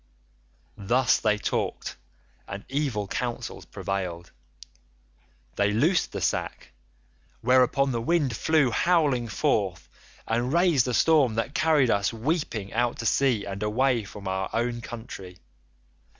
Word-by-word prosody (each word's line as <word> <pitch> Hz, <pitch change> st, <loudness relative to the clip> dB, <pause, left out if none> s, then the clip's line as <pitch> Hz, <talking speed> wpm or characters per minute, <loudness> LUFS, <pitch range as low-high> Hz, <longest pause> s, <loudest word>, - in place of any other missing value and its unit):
"Thus 120 Hz, +6 st, +2 dB
they 105 Hz, -1 st, +2 dB
talked -, -, -3 dB, 0.5 s
and 100 Hz, 0 st, -7 dB
evil 130 Hz, -7 st, -1 dB
counsels 120 Hz, +3 st, -4 dB
prevailed. 90 Hz, -4 st, -4 dB, 1.3 s
They 100 Hz, 0 st, +2 dB
loosed 160 Hz, -, +2 dB
the -, -, -5 dB
sack, -, -, -2 dB, 0.7 s
whereupon 130 Hz, +2 st, +3 dB
the 115 Hz, -2 st, -2 dB
wind 145 Hz, -1 st, +1 dB
flew 155 Hz, -6 st, +2 dB
howling 145 Hz, -5 st, +2 dB
forth 100 Hz, -4 st, -1 dB, 0.4 s
and 120 Hz, +3 st, 0 dB
raised 170 Hz, -6 st, +3 dB
a 125 Hz, -, 0 dB
storm 145 Hz, -8 st, +4 dB
that 115 Hz, +5 st, -2 dB
carried 155 Hz, -7 st, +3 dB
us 100 Hz, 0 st, +1 dB
weeping 115 Hz, -, -2 dB
out 120 Hz, +1 st, 0 dB
to 115 Hz, -, -5 dB
sea 120 Hz, -2 st, +2 dB
and 100 Hz, 0 st, -6 dB
away 120 Hz, +3 st, +1 dB
from 100 Hz, 0 st, -9 dB
our 95 Hz, 0 st, -2 dB
own 120 Hz, 0 st, -1 dB
country. 110 Hz, -6 st, -9 dB
120 Hz, 125 wpm, -26 LUFS, 105-135 Hz, 1.3 s, storm